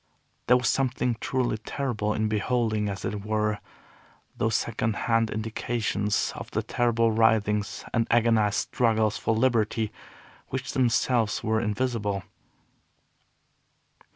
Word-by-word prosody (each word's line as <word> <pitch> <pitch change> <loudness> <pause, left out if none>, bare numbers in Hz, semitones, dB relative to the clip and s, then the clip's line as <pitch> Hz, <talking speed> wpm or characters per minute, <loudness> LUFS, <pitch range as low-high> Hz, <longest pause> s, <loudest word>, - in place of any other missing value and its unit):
There 125 - +6
was 125 -3 -1
something 125 -2 +1
truly 125 -4 -1
terrible 110 -3 -2
in 110 0 0
beholding, 110 -1 0
as 95 -1 -5
it 100 -1 -3
were, 105 0 0 0.8
those 110 0 0
second 110 -1 -1
hand 115 0 +1
indications 110 -1 -1
of - - -7
the - - -2
terrible 115 -2 +1
writhings 110 -2 +1
and 115 -1 +1
agonized 115 -3 +3 0.2
struggles 110 -3 +2
for 110 - 0
liberty 110 -2 +1 0.6
which 130 0 -4
themselves 120 -3 +1
were 110 0 +1
invisible. 105 -3 -1
110 Hz, 115 wpm, -26 LUFS, 105-120 Hz, 0.8 s, There